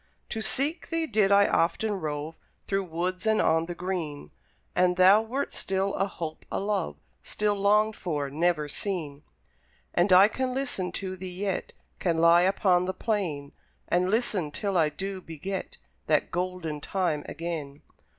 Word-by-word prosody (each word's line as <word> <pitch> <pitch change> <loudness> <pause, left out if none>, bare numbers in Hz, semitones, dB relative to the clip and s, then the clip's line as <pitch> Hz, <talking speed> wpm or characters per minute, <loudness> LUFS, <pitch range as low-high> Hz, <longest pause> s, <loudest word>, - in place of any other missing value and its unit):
To 220 - -3
seek 295 +9 +1
thee 330 -1 0
did 210 -9 +2
I 200 0 +6
often 190 +6 +1
rove 155 -3 -4 0.3
Through 195 -1 0
woods 180 +4 -3
and 220 0 +3
on 160 +1 +2
the 175 - -5
green; 170 -5 -4 0.4
And 180 0 +3
thou 190 +4 +7
wert 250 +5 -3
still 195 +1 0
a 195 - 0
hope, 160 -4 -6
a - - -1
love; 200 - -1 0.3
Still 210 0 -1
longed 210 +2 +3
for, 150 -5 -2
never 160 0 +1
seen. 150 -4 -3 0.7
And 175 +3 +2
I 185 +2 +8
can 255 +3 -2
listen 245 -10 -1
to 185 0 -4
thee 185 0 -6
yet; 195 -2 -2 0.3
Can 170 -3 0
lie 170 +1 +6
upon 180 -1 +3
the 185 0 -3
plain 175 -11 -2 0.4
And 180 +1 +2
listen, 210 -7 +1
till 195 +6 -3
I 160 -3 +4
do 190 +5 -5
beget 175 +4 -6 0.3
That - - +2
golden 180 -4 -3
time 170 -4 -1
again. 155 -4 -5
185 Hz, 160 wpm, -27 LUFS, 165-200 Hz, 0.7 s, I